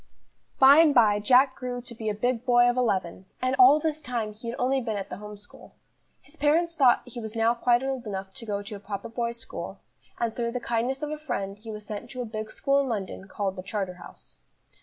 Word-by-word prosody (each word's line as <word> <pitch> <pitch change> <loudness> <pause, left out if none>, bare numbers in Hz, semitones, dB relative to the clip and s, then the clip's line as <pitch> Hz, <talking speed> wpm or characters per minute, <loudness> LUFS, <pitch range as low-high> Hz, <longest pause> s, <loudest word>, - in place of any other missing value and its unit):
BY 275 +2 +8
and 315 -3 +5
by 210 -4 +5
Jack 260 +5 +4
grew 250 -1 -4
to 245 -1 -9
be 220 -1 -4
a 210 - -2
big 245 +2 -1
boy 245 -1 +5
of 245 - +2
eleven, 190 -7 -1
and 255 +1 0
all 265 +4 +8
this 310 0 -2
time 235 -6 -3
he 230 +2 -7
had 235 - -5
only 265 +1 +1
been 225 -3 -3
at 195 - -6
the 180 - -5
home 210 0 -9
school. 205 0 -13 0.5
His 285 - -14
parents 330 +3 +2
thought 260 -6 +4
he 245 -1 -8
was 220 -1 -7
now 225 +1 +3
quite 240 +1 +2
old 265 -3 -3
enough 190 -1 -5
to 245 - -8
go 205 -1 -2
to 205 +1 -8
a - - -8
proper 200 +2 -6
boys' 235 0 -3
school, 230 - -7 0.4
and 230 -2 -1
through 235 -1 -2
the 250 - -2
kindness 240 +4 -1
of 300 - -3
a 305 - -4
friend, 195 -10 -4
he 225 +1 -11
was 210 -1 -7
sent 210 -1 -6
to 255 - -6
a - - -6
big 215 -1 -5
school 275 +4 +1
in 280 - 0
London 195 -3 -4
called 195 -1 -3
the 185 - -6
Charterhouse. 190 -2 -7
235 Hz, 240 wpm, -26 LUFS, 210-255 Hz, 0.5 s, BY